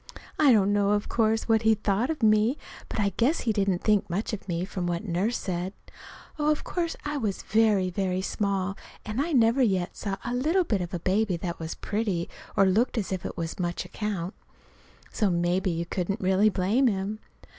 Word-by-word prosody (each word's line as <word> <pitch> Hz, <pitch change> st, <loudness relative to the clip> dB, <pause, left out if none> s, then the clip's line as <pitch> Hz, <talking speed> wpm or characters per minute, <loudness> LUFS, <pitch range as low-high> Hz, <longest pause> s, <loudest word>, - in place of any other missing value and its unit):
I 290 Hz, -3 st, +6 dB
don't 205 Hz, -3 st, +4 dB
know, 205 Hz, 0 st, +3 dB
of 205 Hz, 0 st, 0 dB
course, 220 Hz, -1 st, +1 dB
what 225 Hz, -1 st, +3 dB
he 220 Hz, 0 st, +4 dB
thought 210 Hz, +3 st, 0 dB
of 310 Hz, -6 st, -3 dB
me, 215 Hz, +5 st, +4 dB, 0.3 s
but -, -, -4 dB
I 200 Hz, -1 st, +3 dB
guess 270 Hz, +8 st, +2 dB
he 225 Hz, -, 0 dB
didn't 195 Hz, -3 st, 0 dB
think 210 Hz, -3 st, +2 dB
much 200 Hz, +6 st, -2 dB
of 200 Hz, -, -6 dB
me, 175 Hz, 0 st, -1 dB
from 185 Hz, -2 st, -4 dB
what 175 Hz, +3 st, -2 dB
Nurse 195 Hz, +6 st, 0 dB
said. 185 Hz, +1 st, -3 dB, 0.7 s
Of 300 Hz, 0 st, +1 dB
course 340 Hz, -2 st, -2 dB
I 295 Hz, 0 st, -2 dB
was 215 Hz, -7 st, -2 dB
very, 210 Hz, -3 st, +2 dB
very 185 Hz, 0 st, -1 dB
small, 195 Hz, -1 st, -1 dB, 0.3 s
and 215 Hz, +5 st, -2 dB
I 330 Hz, +4 st, -1 dB
never 240 Hz, -1 st, +4 dB
yet 190 Hz, -7 st, +1 dB
saw 195 Hz, -2 st, -3 dB
a 245 Hz, -, -2 dB
little 315 Hz, +9 st, +2 dB
bit 210 Hz, -, 0 dB
of 175 Hz, -, -4 dB
a -, -, -3 dB
baby 190 Hz, +1 st, +1 dB
that 170 Hz, 0 st, -5 dB
was 160 Hz, 0 st, -5 dB
pretty, 205 Hz, -5 st, -2 dB, 0.3 s
or 195 Hz, -, +6 dB
looked 220 Hz, +7 st, +2 dB
as 205 Hz, -4 st, -2 dB
if 185 Hz, -2 st, -2 dB
it -, -, -8 dB
was 165 Hz, +1 st, -4 dB
much 175 Hz, -1 st, -2 dB
account. 200 Hz, -3 st, -4 dB, 0.8 s
So 210 Hz, -4 st, +1 dB
maybe 175 Hz, +2 st, +1 dB
you 170 Hz, 0 st, -2 dB
couldn't 190 Hz, +4 st, -2 dB
really 190 Hz, +2 st, +3 dB
blame 210 Hz, +7 st, +2 dB
him. 205 Hz, 0 st, -1 dB
205 Hz, 200 wpm, -27 LUFS, 185-225 Hz, 0.8 s, I